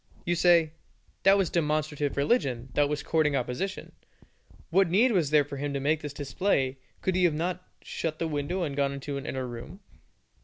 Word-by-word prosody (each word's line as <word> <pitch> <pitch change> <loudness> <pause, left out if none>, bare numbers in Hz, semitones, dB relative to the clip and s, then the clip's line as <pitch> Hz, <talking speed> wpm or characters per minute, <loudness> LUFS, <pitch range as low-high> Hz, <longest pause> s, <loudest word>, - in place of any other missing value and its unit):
You 175 - +1
say, 170 -2 +4 0.5
"That 195 +1 +6
was 195 -4 +1
demonstrative 150 -3 -1
religion, 135 - +1
that 145 -1 +2
was 150 0 -2
courting 155 -3 +1
opposition. 135 +10 -3 0.8
What 190 +1 +4
need 225 +9 +4
was 175 -9 +2
there 150 -1 +4
for 140 0 -7
him 140 0 -3
to - - 0
make 150 +3 +1
this 145 - -5
display; 135 -2 -1 0.2
could 185 - +1
he 180 -1 +4
not 165 +4 -2
have 180 - -31 0.2
shut 155 -1 -3
the 165 - -1
window 155 +5 -2
and 145 -4 -3
gone 140 -1 +1
into 140 +1 -5
an 140 - -6
inner 130 -1 -3
room? 120 +10 -8
150 Hz, 190 wpm, -28 LUFS, 140-175 Hz, 0.8 s, That